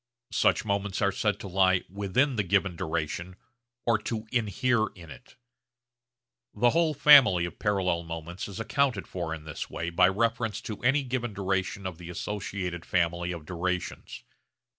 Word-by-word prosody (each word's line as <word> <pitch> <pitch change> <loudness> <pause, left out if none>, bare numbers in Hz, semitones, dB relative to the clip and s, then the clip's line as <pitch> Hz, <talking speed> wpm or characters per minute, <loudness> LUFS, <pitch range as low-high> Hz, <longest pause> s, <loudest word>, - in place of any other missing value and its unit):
Such - - +2
moments 100 -1 -1
are 100 - +3
said 105 +2 -1
to - - -6
lie 95 -1 +3
'within' 100 +8 0
the 105 - +2
given 95 -1 +1
duration 85 +2 -3 0.5
or 115 -2 +3
to 110 +1 -4
'inhere' 115 0 +1
in 85 -4 -12
it. 125 - -14 1.2
The 120 +3 +4
whole 165 -2 +2
family 125 -13 +7
of 85 - -8
parallel 95 -4 +1
moments 85 +1 -6
is 100 +1 -8
accounted 130 +4 0
for 85 -3 -4
in 80 -1 -5
this 80 -1 -6
way 85 +1 -4
by 90 +2 +5
reference 115 +1 0
to 105 -3 -7
any 135 +4 +3
given 120 -4 -3
duration 95 0 -2
of 90 -3 -5
the 85 -1 -9
associated 90 -2 -4
family 85 0 0
of 85 -3 -7
durations. 90 +2 -4
95 Hz, 160 wpm, -28 LUFS, 85-115 Hz, 1.2 s, family